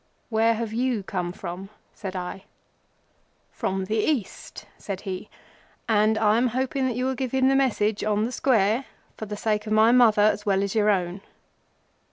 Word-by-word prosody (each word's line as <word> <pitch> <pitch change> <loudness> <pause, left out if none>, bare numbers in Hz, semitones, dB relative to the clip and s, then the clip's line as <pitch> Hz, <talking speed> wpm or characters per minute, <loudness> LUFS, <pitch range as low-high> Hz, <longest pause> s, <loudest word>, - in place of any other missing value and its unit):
"Where 225 0 +2
have 225 -1 -4
you 240 -3 0
come 180 -2 -3
from?" 180 +2 -7 0.2
said 190 -2 -7
I. 185 +1 -6 1.1
"From 190 0 -2
the 220 +3 -1
East," 235 -3 -3
said 195 -2 -5
he, 190 +1 -6 0.6
"and 215 0 +3
I 215 0 +3
am 250 - +2
hoping 260 +2 -1
that 245 - -2
you 250 +1 -1
will 265 - 0
give 260 -1 -4
him 265 0 +3
the 270 - +3
message 220 -6 +1
on 210 0 +1
the 240 - -4
Square—for 225 -2 -1
the 210 0 -5
sake 215 0 -1
of 215 - -1
my 220 +2 +5
Mother 230 -4 +5
as 210 0 +2
well 195 -1 +1
as 200 - -2
your 215 -1 +2
own." 185 -1 0
215 Hz, 180 wpm, -25 LUFS, 195-245 Hz, 1.1 s, my